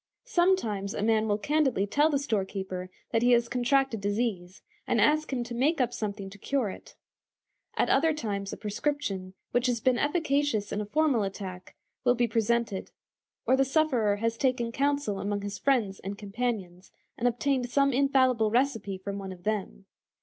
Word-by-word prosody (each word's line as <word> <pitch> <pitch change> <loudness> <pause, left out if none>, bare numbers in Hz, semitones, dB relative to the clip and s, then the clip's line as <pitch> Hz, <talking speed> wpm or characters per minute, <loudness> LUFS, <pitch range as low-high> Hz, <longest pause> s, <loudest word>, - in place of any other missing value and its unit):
Sometimes 345 - +1
a - - -2
man 220 0 +2
will 205 -1 +1
candidly 265 -2 +1
tell 290 +9 +3
the 290 - +2
storekeeper 190 -7 -3 0.2
that 225 - +2
he 245 +1 +5
has 235 0 +3
contracted 250 -1 +1
disease, 205 -3 -2 0.2
and - - +2
ask 305 0 +3
him 250 -2 -1
to 235 0 -7
make 280 +7 +1
up 245 -2 +1
something 205 -4 -4
to 205 - -13
cure 255 -3 -1
it. - - -12 0.8
At - - +3
other 320 +4 +3
times 205 -9 -3
a - - -6
prescription, 205 -4 -3 0.2
which 245 +1 +2
has 245 -2 0
been 250 +1 +2
efficacious 290 - 0
in 210 - -1
a 210 - -5
former 280 -3 +2
attack, 190 -2 -6 0.3
will 245 -1 +4
be 240 0 +2
presented, 225 -2 0 0.6
or 260 - +4
the 270 - +3
sufferer 265 -7 +2
has 230 +2 -1
taken 250 -3 +1
counsel 280 -6 0
among 205 0 -2
his 205 0 -5
friends 230 -8 +1
and 200 +1 -6
companions, 200 -4 -4 0.2
and 240 - 0
obtained 245 +1 0
some 275 +1 +3
infallible 260 -4 +3
recipe 225 -5 0
from 200 +1 -5
one 195 -1 -6
of 180 -1 -11
them. 200 - -3
230 Hz, 175 wpm, -28 LUFS, 200-270 Hz, 0.8 s, he